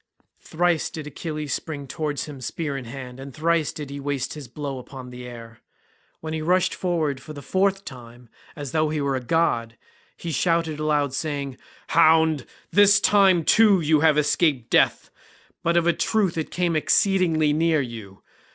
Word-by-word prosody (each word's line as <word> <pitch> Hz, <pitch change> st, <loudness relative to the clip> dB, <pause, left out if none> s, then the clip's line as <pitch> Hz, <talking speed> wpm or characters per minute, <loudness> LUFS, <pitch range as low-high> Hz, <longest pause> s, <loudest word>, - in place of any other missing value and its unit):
Thrice 175 Hz, 0 st, 0 dB
did 155 Hz, -2 st, -7 dB
Achilles 150 Hz, -1 st, -5 dB
spring 145 Hz, -4 st, -5 dB
towards 150 Hz, +1 st, -3 dB
him 145 Hz, -3 st, -10 dB
spear 145 Hz, +4 st, -4 dB
in 135 Hz, -2 st, -5 dB
hand, 125 Hz, +1 st, -9 dB
and 135 Hz, +1 st, -8 dB
thrice 165 Hz, -1 st, +1 dB
did 145 Hz, -2 st, -8 dB
he 140 Hz, -, -6 dB
waste 140 Hz, -2 st, -3 dB
his 150 Hz, -4 st, -9 dB
blow 140 Hz, +1 st, -5 dB
upon 125 Hz, 0 st, -10 dB
the 125 Hz, 0 st, -9 dB
air. 115 Hz, -2 st, -11 dB, 0.6 s
When 160 Hz, 0 st, -5 dB
he 160 Hz, -, -3 dB
rushed 180 Hz, +3 st, +2 dB
forward 160 Hz, -7 st, -1 dB
for 155 Hz, -, -10 dB
the 145 Hz, -, -9 dB
fourth 195 Hz, +5 st, 0 dB
time 120 Hz, -1 st, -11 dB, 0.3 s
as 145 Hz, -4 st, -6 dB
though 155 Hz, -1 st, +1 dB
he 155 Hz, 0 st, -2 dB
were 140 Hz, -1 st, 0 dB
a -, -, -1 dB
god, 120 Hz, -5 st, 0 dB, 0.4 s
he 170 Hz, -, -5 dB
shouted 165 Hz, 0 st, 0 dB
aloud 150 Hz, -3 st, 0 dB
saying, 140 Hz, -2 st, -3 dB, 0.3 s
"Hound, 160 Hz, -3 st, +4 dB, 0.2 s
this 205 Hz, 0 st, +6 dB
time 190 Hz, -4 st, +4 dB
too 210 Hz, +2 st, +5 dB
you 155 Hz, -1 st, +3 dB
have 155 Hz, -1 st, +4 dB
escaped 145 Hz, -4 st, +1 dB
death—but 170 Hz, +1 st, -1 dB
of 170 Hz, -, +2 dB
a 170 Hz, -, +3 dB
truth 205 Hz, -3 st, 0 dB
it 160 Hz, -2 st, -3 dB
came 175 Hz, -2 st, -1 dB
exceedingly 165 Hz, -3 st, +2 dB
near 160 Hz, 0 st, +2 dB
you. 115 Hz, -7 st, -7 dB
155 Hz, 170 wpm, -24 LUFS, 135-165 Hz, 0.6 s, this